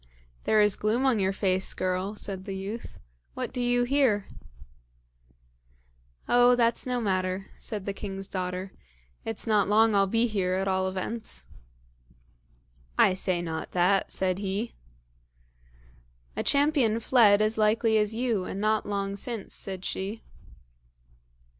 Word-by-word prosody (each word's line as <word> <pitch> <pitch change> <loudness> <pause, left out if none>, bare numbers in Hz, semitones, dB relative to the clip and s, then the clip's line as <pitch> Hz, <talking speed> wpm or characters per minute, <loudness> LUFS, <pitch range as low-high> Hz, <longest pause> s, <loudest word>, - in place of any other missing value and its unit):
"There 215 - +4
is 210 -2 +4
gloom 225 +5 0
on 255 -5 +3
your 190 0 +2
face, 190 -1 0
girl," 185 +3 -2
said 195 -2 -5
the 195 -2 -5
youth; 205 +5 -7 0.4
"what - - -4
do 250 - -2
you 245 0 +2
here?" 245 -6 +2 2.0
"Oh! 245 0 +5
that's 235 +1 +1
no 250 -1 0
matter," 185 -3 -1
said 205 -3 -5
the 200 - -2
king's 195 -1 -6
daughter. 185 0 -4 0.5
"It's 225 -1 -3
not 210 -3 +3
long 220 +1 +4
I'll 195 -1 +4
be 225 +4 +2
here 190 -5 0
at 190 +1 -1
all 190 0 +1
events." 190 - -5 1.5
"I - - +5
say 185 -2 0
not 160 -1 -5
that," 185 +2 +2
said 185 0 0
he. 200 +3 -3 1.6
"A - - -1
champion 280 -6 +2
fled 220 -4 +5
as 215 +1 +1
likely 220 +1 +3
as 210 +1 0
you, 230 -5 0
and 195 - -5
not 215 +1 +1
long 200 -1 -2
since," 225 0 -5
said 190 -1 -5
she. 200 +4 -4
205 Hz, 140 wpm, -27 LUFS, 190-225 Hz, 2.0 s, Oh